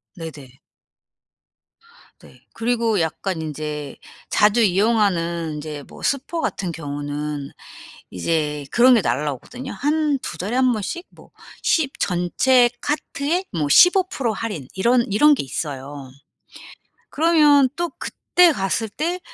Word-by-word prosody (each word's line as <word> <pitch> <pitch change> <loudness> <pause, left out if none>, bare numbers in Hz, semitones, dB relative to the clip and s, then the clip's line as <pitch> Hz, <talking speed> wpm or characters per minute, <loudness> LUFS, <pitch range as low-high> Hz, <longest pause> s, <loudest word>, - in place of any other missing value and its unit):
네네. 145 -5 -10 1.6
네. - - -18
그리고 230 -4 0
약간 165 +1 -3
인제 150 -1 -5 0.3
자주 210 +3 +3
이용하는 180 -6 +1
인제 150 -1 -7
뭐 - - -14
슈퍼 280 +5 -1
같은 180 -3 -2
경우는 145 -1 -5 0.8
이제 150 -3 0
그런 250 +2 +6
게 220 - +3
날아오거든요. 150 - -3
한 305 +1 0
2 - - -6
달에 205 +7 -3
1 255 -1 +3
번씩 345 - -4
뭐 - - -19 0.3
십 295 -5 +1
전체 240 +8 +3
카트에 300 +3 -2
뭐 155 -4 -1
15% 360 - +4
할인 205 - -5
이런 235 +5 +3
이런 295 +9 +5
게 - - -3
있어요. 140 0 -6 1.0
그러면 295 -4 +4
또 345 -2 -2
그때 355 -1 +3
갔을 205 +1 -1
때 345 - -3
205 Hz, 215 characters per minute, -21 LUFS, -, 1.6 s, 그런